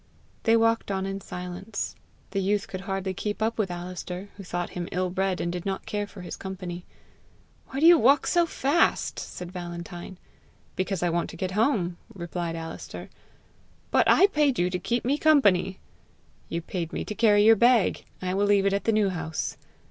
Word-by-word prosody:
They 225 0 +5
walked 225 -1 +2
on 190 -1 -1
in 195 0 -4
silence. 180 +4 -5 0.4
The 195 0 0
youth 200 +1 0
could 185 - -6
hardly 195 -1 -3
keep 205 +2 -3
up 225 +1 -1
with 200 -3 +1
Alister, 180 +2 -6
who 200 - -9
thought 175 -1 -3
him 175 -1 -5
ill 185 0 -1
bred, 190 0 0
and 170 - -1
did 175 -1 -4
not 195 -1 -3
care 205 -1 -2
for 200 - -11
his 180 - -6
company. 180 -2 -6 0.8
"Why 270 - -4
do 315 - +4
you 340 0 +9
walk 275 +5 +5
so 345 -1 +3
fast?" 310 +2 +1
said 180 -1 -7
Valentine. 175 0 -7 0.6
"Because 185 -1 -1
I 175 - +2
want 170 0 -1
to - - -9
get 185 +2 -2
home," 195 -5 +1 0.2
replied 170 -2 -4
Alister. 165 0 -7 0.8
"But - - +4
I 390 - +7
paid 300 -9 +2
you 180 +1 +1
to 180 - -1
keep 235 +7 -1
me 280 +4 +1
company!" 200 - +4 0.7
"You 170 0 -3
paid 170 -2 -4
me - - -3
to - - -4
carry 210 -2 +4
your 225 +1 +8
bag. 235 -1 +3 0.2
I 185 0 -1
will 200 +1 +2
leave 200 -1 +4
it 200 - +3
at 200 - -1
the 225 - +3
New 210 -2 +3
House." 160 -3 -3
195 Hz, 195 wpm, -26 LUFS, 180-215 Hz, 0.8 s, you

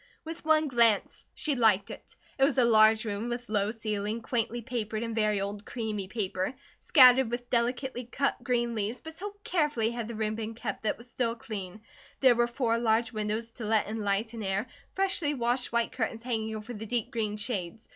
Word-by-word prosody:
With 325 +1 -7
one 315 -1 +4
glance, 235 -6 +2
she 305 - 0
liked 220 -6 +3
it. - - -11 0.2
It - - +4
was 275 0 +3
a 250 - +5
large 220 -1 +5
room 210 +2 -3
with 240 -1 -5
low 205 -1 +1
ceiling, 215 0 -3
quaintly 235 0 -1
papered 225 -2 -3
in 230 -1 -3
very 215 -2 +1
old 200 +1 -4
creamy 215 -5 -4
paper, 190 +2 -2 0.2
scattered 255 -4 +7
with 245 +1 -5
delicately 245 +1 0
cut 275 +1 -1
green 240 -1 0
leaves, 220 +2 -2
but 320 0 -9
so 405 +5 -7
carefully 295 -10 +1
had 235 -2 -4
the 235 - -6
room 215 0 -1
been 225 0 -5
kept, - - -4
that 215 - +1
it - - -24
was 235 - -14
still 235 -1 -1
clean. 210 -3 -7 0.4
There 260 -2 +6
were 240 0 +2
four 235 -2 0
large 230 0 +2
windows 215 +1 -3
to 230 - -7
let 215 0 +2
in 220 +1 -4
light 205 +2 0
and 225 -2 -5
air, 195 +2 -1 0.2
freshly 375 -6 0
washed 245 0 0
white 235 0 +1
curtains 225 -1 -3
hanging 220 -3 -2
over 215 +3 -7
the 220 0 -7
deep 235 -1 -1
green 215 -2 -2
shades. 210 -2 -4
230 Hz, 205 wpm, -29 LUFS, 215-245 Hz, 0.4 s, scattered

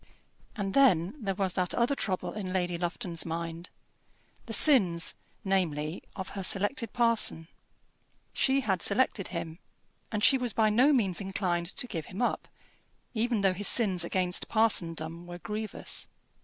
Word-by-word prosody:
And 195 -4 -3
then 190 -11 +4
there 195 -2 -1
was 190 -2 -1
that 180 -2 -1
other 240 +3 +2
trouble 190 -9 -2
in 195 -3 -5
Lady 180 -2 0
Lufton's 175 0 -2
mind, 165 +1 -5 0.8
the - - -6
sins, 200 - +4 0.3
namely, 165 -4 0
of 190 -1 -5
her 195 - -5
selected 205 +5 -1
parson. 230 -9 +1 0.9
She 270 0 +2
had 190 -8 0
selected 235 -6 +1
him, 170 -1 -6 0.5
and 210 -2 -2
she 265 +2 +6
was 245 -3 -1
by 215 -1 +3
no 255 +7 +5
means 205 -9 +1
inclined 185 -3 -1
to - - +1
give 165 -10 -5
him 190 - -8
up, 245 - -1 0.7
even 230 -1 0
though 195 -1 +3
his 205 +2 -2
sins 190 -7 +3
against 180 +1 0
parsondom 170 -6 +1
were 175 0 -7
grievous. 210 +4 -4
190 Hz, 150 wpm, -29 LUFS, 175-225 Hz, 0.9 s, she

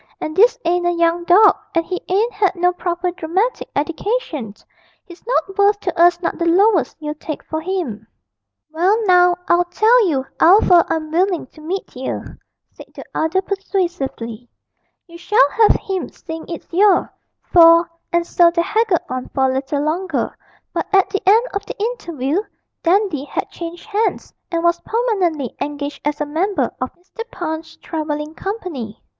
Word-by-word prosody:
And 310 - -5
this 470 +6 +5
ain't 350 +1 +1
a - - +3
young 340 0 +1
dog, 405 +5 +6 0.2
and 335 0 +2
he 365 +1 -4
ain't 410 +3 0
'ad 390 -2 +3
no 355 0 +2
proper 355 0 -2
dramatic 365 +8 -2
eddication; 310 - -2 0.5
he's 345 -1 -14
not 390 -5 0
worth 405 +1 +4
to 360 - -3
us 345 0 +4
not - - -2
the 340 - 0
lowest 360 - +3
you'd 300 -1 -6
take 310 - -5
for 315 0 -4
him.' 340 - -4 0.6
'Well 360 +7 +2
now, 360 -1 +5
I'll 350 +1 +3
tell 435 +5 +3
you 270 -5 0
'ow 370 +6 +7
fur 345 -2 +5
I'm 310 -1 -2
willing 360 +1 +1
to 310 - -15
meet 365 +2 -5
yer,' 260 +1 -6 0.3
said - - -14
the - - -8
other 345 +4 0
persuasively; 340 - -3 0.6
'you 340 -1 -13
shall 345 -5 +3
have 445 -2 +5
him, 380 -2 -4
seein' 320 -2 -9
it's 335 0 -8
you, 390 +1 +4 0.5
for 335 0 +7
' - - -54
And 345 -1 +1
so 345 0 +4
they 340 0 0
haggled 415 -2 +1
on 255 0 -5
for 265 -1 +2
a - - -2
little 275 +2 -2
longer, 345 +5 -2 0.4
but - - -2
at 390 -1 +3
the 395 - -1
end 450 +4 +5
of 400 -1 -2
the - - -7
interview 350 - -2 0.4
Dandy 350 -5 +1
had - - -4
changed 340 0 -8
hands, 435 +1 -2 0.2
and 335 -2 -2
was 340 0 +2
permanently 375 - -1
engaged 290 0 -4
as 295 0 -2
a 295 - -1
member 320 - -1
of 255 - -1
Mr. 365 +6 -11
Punch's 320 -3 -5
travelling 305 -2 -4
company. 335 - -6
345 Hz, 170 wpm, -19 LUFS, 315-390 Hz, 0.6 s, ow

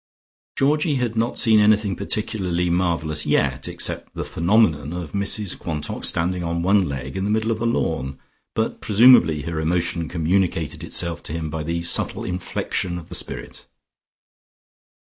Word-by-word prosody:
Georgie 150 +2 +2
had 120 -3 -1
not 115 +2 0
seen 110 -3 +5
anything 105 -2 +3
particularly 95 -4 -1
marvellous 85 -4 0
yet, 65 -1 +1
except - - -3
the - - -4
phenomenon 85 - +2
of 90 -3 -5
Mrs 100 0 +1
Quantock 75 -3 -4
standing 90 +2 0
on 85 0 -2
one 95 -1 +3
leg 65 +1 -5
in 95 - -2
the 100 - -1
middle 110 +1 +1
of 110 - -2
the 115 - 0
lawn, 70 - -1 0.4
but - - -1
presumably 100 - +5
her 80 0 -3
emotion 85 0 -1
communicated 85 -2 0
itself 85 -2 -3
to - - -6
him 80 -2 -4
by 80 0 -3
the 85 +2 -3
subtle 85 - 0
infection 90 0 -2
of 85 0 -10
the - - -8
spirit. - - -5
90 Hz, 155 wpm, -22 LUFS, 80-105 Hz, 0.4 s, seen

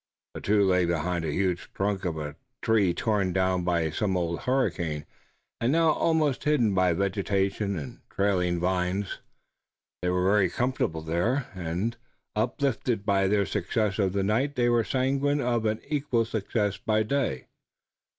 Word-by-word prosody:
The - - -7
two 105 0 +3
lay 90 -2 +3
behind 85 +1 -1
the 80 - -1
huge 90 +1 -1
trunk 100 -1 -1
of 85 -3 -2
a 75 -1 -5 0.3
tree 105 -5 +3
torn 100 -1 0
down 95 -1 +1
by 85 -3 +1
some 95 +3 0
old 85 -1 -1
hurricane 85 - -1 0.5
and 120 +2 +1
now 165 0 +4
almost 155 -4 +1
hidden 135 -9 +2
by 95 -1 +3
vegetation 100 +1 0
and 70 -5 -7
trailing 90 -3 +1
vines. 90 +2 -1 0.8
They 90 - 0
were 90 0 +1
very 100 -1 +4
comfortable 120 -9 -1
there, 90 - 0
and, 95 +6 -3 0.4
uplifted 120 -1 0
by 100 -2 +3
their 100 0 +2
success 105 +1 -1
of 95 -2 +1
the 100 -1 0
night 130 +8 +1
they 120 -1 +2
were 120 -1 +3
sanguine 135 +4 +1
of 120 -4 0
an 110 +1 0
equal 135 -6 0
success 105 -2 -1
by 110 0 +1
day. 125 - -1
100 Hz, 155 wpm, -27 LUFS, 90-120 Hz, 0.8 s, now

